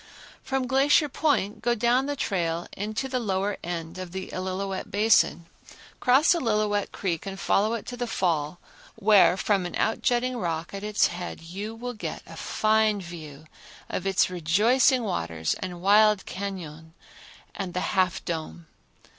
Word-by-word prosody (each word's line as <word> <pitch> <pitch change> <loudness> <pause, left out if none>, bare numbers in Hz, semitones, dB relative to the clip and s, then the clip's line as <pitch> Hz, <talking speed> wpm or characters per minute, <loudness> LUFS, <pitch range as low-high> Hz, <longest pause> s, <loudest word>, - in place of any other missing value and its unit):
From 265 -1 -1
Glacier 275 +4 +4
Point 275 -8 0
go 240 0 +1
down 240 +4 +2
the 290 - -2
trail 170 -8 -1
into 215 +6 -3
the 255 -1 -1
lower 200 -2 -1
end 170 0 -5
of 185 -1 -7
the 190 0 -5
Illilouette 190 +1 -3
basin, 210 -4 +3 0.5
cross 265 +7 +5
Illilouette 210 - 0
Creek 180 -1 -3
and 195 0 -6
follow 215 +3 +2
it 225 - -6
to 245 - -6
the 245 0 -3
Fall 165 -6 -1 0.4
where 210 -4 +5
from 195 -1 +1
an - - -7
outjutting 245 +2 0
rock 170 -5 -3
at 200 0 -6
its 210 -1 +2
head 175 -1 -6
you 200 +7 -6
will 245 +2 -5
get 215 - -6
a - - -11
fine 215 -1 +1
view 160 -5 -9 0.4
of 190 - -3
its 190 -1 +3
rejoicing 210 - +3
waters 80 - -2
and 180 -1 -6
wild 210 0 +5
cañon 165 -5 -6 0.6
and 185 -3 -5
the 180 - 0
Half 185 -1 +1
Dome. 165 0 -5
200 Hz, 155 wpm, -26 LUFS, 175-225 Hz, 0.6 s, cross